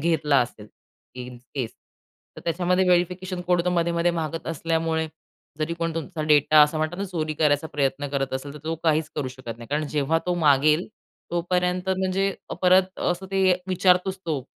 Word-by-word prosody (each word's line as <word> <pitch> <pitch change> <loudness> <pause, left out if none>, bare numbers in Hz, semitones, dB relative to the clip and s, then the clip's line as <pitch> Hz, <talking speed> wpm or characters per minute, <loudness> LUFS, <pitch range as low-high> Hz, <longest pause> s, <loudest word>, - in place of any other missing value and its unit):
घेतला 150 -3 +2
असेल 110 -3 -4 0.5
in 125 -1 -8 0.2
case 125 -5 -2 0.7
तर - - -8
त्याच्यामध्ये 180 +2 +1
व्हेरिफिकेशन 180 +1 +1
कोड 180 -1 +2
मधेमधे 170 0 +1
मागत 165 -1 -4
असल्यामुळे 165 0 -1 0.5
जरी 160 +2 -1
कोण 165 -1 -2
तुमचा 165 0 -4
डेटा 150 0 +5
असा 150 +1 +2
म्हणत 155 +2 -1
ना, 200 - -2
चोरी 155 -5 -3
करायचा 145 0 +2
प्रयत्न 145 0 -1
करत 135 -1 -2
असेल, 140 +2 -5
तर - - -8
तो 165 +1 -1
काहीच 155 -1 +2
करू 140 -4 -1
शकत 125 -3 -8
नाही. 115 - -10
कारण 150 +1 0
जेव्हा 150 +2 +1
तो 180 - +1
मागेल. 155 +1 +3 0.4
तोपर्यंत 180 +1 0
म्हणजे 190 +1 0 0.3
परत 185 +1 +4
असं 180 +2 -1
ते 190 -1 +4 0.2
विचारतोच 185 +1 +2
तो 145 -5 -1
165 Hz, 165 wpm, -24 LUFS, 150-180 Hz, 0.7 s, डेटा